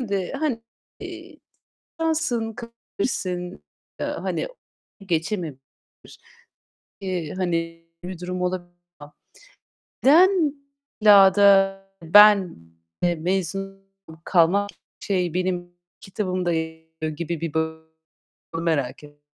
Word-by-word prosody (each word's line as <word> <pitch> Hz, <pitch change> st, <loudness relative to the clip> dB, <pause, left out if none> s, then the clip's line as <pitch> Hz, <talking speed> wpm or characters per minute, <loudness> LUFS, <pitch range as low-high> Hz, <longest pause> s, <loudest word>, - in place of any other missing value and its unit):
Şimdi, 200 Hz, -6 st, -2 dB
hani, 275 Hz, -5 st, -2 dB, 0.4 s
eee, -, -, -10 dB, 0.6 s
şansın 310 Hz, -9 st, 0 dB
kırabilirsin, 200 Hz, -6 st, -5 dB, 0.4 s
eee, -, -, -1 dB
hani, -, -, -3 dB, 0.6 s
geçememiş 165 Hz, -4 st, -2 dB, 1.4 s
eee, 180 Hz, -5 st, -3 dB
hani 165 Hz, -2 st, -2 dB, 0.2 s
bir 180 Hz, -1 st, -6 dB
durum 180 Hz, 0 st, -4 dB
olabilir 180 Hz, -1 st, -2 dB, 0.3 s
ama 145 Hz, 0 st, -13 dB, 0.9 s
neden 330 Hz, +1 st, +5 dB, 0.5 s
illa 200 Hz, -3 st, +7 dB
da 195 Hz, -1 st, +5 dB, 0.2 s
ben, 200 Hz, +1 st, +6 dB, 0.5 s
eee, 175 Hz, -1 st, +2 dB
mezun 195 Hz, +3 st, -3 dB, 0.4 s
kalmak 195 Hz, +4 st, +3 dB, 0.3 s
şey, 180 Hz, -4 st, -1 dB
benim 180 Hz, -1 st, -2 dB, 0.3 s
kitabımda 185 Hz, -3 st, -2 dB
yer 160 Hz, 0 st, -4 dB, 0.2 s
alıyor 155 Hz, -1 st, -3 dB
gibi 170 Hz, -1 st, -4 dB
bir 165 Hz, -3 st, -3 dB
bak 160 Hz, 0 st, -2 dB, 0.7 s
onu 165 Hz, -, -3 dB
merak 140 Hz, -5 st, -1 dB
et 145 Hz, 0 st, -16 dB
185 Hz, 100 wpm, -23 LUFS, 165-205 Hz, 1.4 s, illa